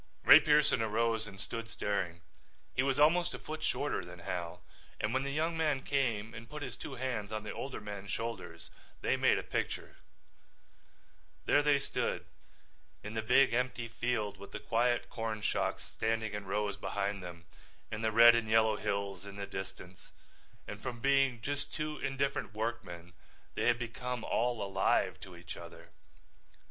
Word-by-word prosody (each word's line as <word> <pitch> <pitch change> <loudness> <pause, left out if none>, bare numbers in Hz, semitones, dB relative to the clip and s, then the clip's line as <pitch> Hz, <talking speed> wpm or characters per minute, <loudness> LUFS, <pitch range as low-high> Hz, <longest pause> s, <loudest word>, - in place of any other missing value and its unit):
Ray - - +11
Pearson 150 -5 +4
arose 110 0 +1
and 100 -2 -10
stood 115 +2 -5
staring. 95 -5 -2 0.5
He - - +2
was 135 0 +1
almost 170 +4 +4
a - - -5
foot 155 0 -6
shorter - - -1
than - - -10
Hal, 90 0 -5 0.4
and 105 - -1
when 130 - +2
the 140 - -2
younger 160 +4 0
man 150 -5 +1
came 115 -6 0
and 115 0 -9
put 150 -1 -6
his - - -4
two 135 - -7
hands 120 -5 -3
on 110 0 -3
the 105 - -5
older 135 - -5
man's 100 -1 -7
shoulders 95 -8 -5 0.3
they - - +2
made - - +4
a - - -2
picture. - - -3 1.5
There 145 - +5
they 145 -1 +4
stood 140 - -2 0.8
in 105 +1 -6
the 110 - -1
big 125 +3 +5
empty 125 -1 0
field 115 -3 -1
with 100 +1 -11
the - - -4
quiet 120 +1 +1
corn 110 -2 -4
shocks - - 0
standing 110 -1 -1
in 105 -2 -5
rows 105 0 -1
behind 100 0 -2
them 85 -2 -9 0.5
and 110 0 -3
the 110 - +2
red 115 +2 +9
and 115 -2 0
yellow 110 -1 +4
hills 100 -2 -2
in 100 - -8
the 100 0 -4
distance, 95 -2 -8 0.6
and 105 +1 -7
from 125 -2 -5
being 135 -3 +3
just 145 +2 -2
two 150 -1 -3
indifferent 135 -5 -1
workmen 90 -7 -4 0.4
they - - -1
had 120 -1 +4
become 120 0 -4
all 120 -2 0
alive 100 -1 +1
to 90 -2 -10
each 85 0 -8
other. 85 -1 -11
115 Hz, 170 wpm, -33 LUFS, 100-130 Hz, 1.5 s, Ray